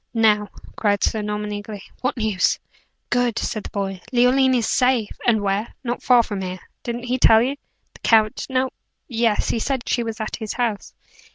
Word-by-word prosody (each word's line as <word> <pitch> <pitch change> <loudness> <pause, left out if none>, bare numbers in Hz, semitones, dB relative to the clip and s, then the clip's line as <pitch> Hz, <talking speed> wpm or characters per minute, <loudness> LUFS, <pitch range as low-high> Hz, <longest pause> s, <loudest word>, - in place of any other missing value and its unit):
"Now," 210 -2 +3 0.3
cried 205 -2 +1
Sir 220 - +1
Norman, 210 0 -3
eagerly, 205 -1 -6 0.2
"what 255 - -1
news?" 215 -5 +1 0.5
"Good!" 245 -2 +1
said 215 - -3
the - - -5
boy. 195 -2 -3
"Leoline 255 +1 +4
is 235 -3 +1
safe!" 250 -4 +2 0.2
"And 220 -3 +4
where?" 200 +2 -1
"Not 240 -1 -3
far 245 -2 +5
from 205 -3 -4
here. 185 0 -4 0.2
Didn't 240 0 -4
he 250 +1 -1
tell 225 -1 +6
you?" 270 +3 -1 0.4
"The - - -16
count? 220 -2 +3
No 260 0 0 0.4
yes; 230 -3 +1
he 230 - 0
said 265 +1 -2
she 240 - +1
was 225 -2 -4
at 220 - -3
his 220 -2 -4
house." 230 -5 -2
225 Hz, 185 wpm, -22 LUFS, 210-245 Hz, 0.5 s, tell